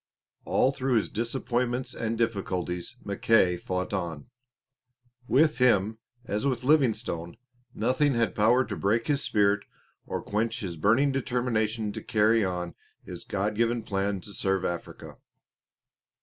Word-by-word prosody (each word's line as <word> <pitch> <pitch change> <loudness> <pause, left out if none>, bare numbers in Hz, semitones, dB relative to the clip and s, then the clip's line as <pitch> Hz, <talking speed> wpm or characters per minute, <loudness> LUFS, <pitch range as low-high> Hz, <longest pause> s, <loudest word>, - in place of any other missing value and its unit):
All 130 - +3
through 130 -2 -1
his 110 - +1
disappointments 120 +2 -1
and 115 0 -2
difficulties 95 -3 -2
Mackay 100 -2 +3
fought 90 +2 -3
on. 85 -1 -4 1.0
With 150 +2 +3
him, 110 -3 +3 0.3
as 105 -1 -2
with 125 -3 -1
Livingstone, 115 - +1 0.4
nothing 130 +5 +2
had 115 -5 +1
power 120 +5 +3
to 100 - -5
break 110 +5 +1
his 145 -2 +1
spirit 105 -4 +2 0.4
or - - -3
quench 115 +3 -1
his 90 -4 -4
burning 115 - +3
determination 115 -5 -1
to - - -6
carry 110 -1 +3
on 90 -2 -3 0.3
his - - -8
God 105 +2 -1
given 115 +1 0
plan 100 -1 -1
to 100 - -10
serve 95 -1 0
Africa. 85 -1 -6
110 Hz, 135 wpm, -27 LUFS, 100-125 Hz, 1.0 s, All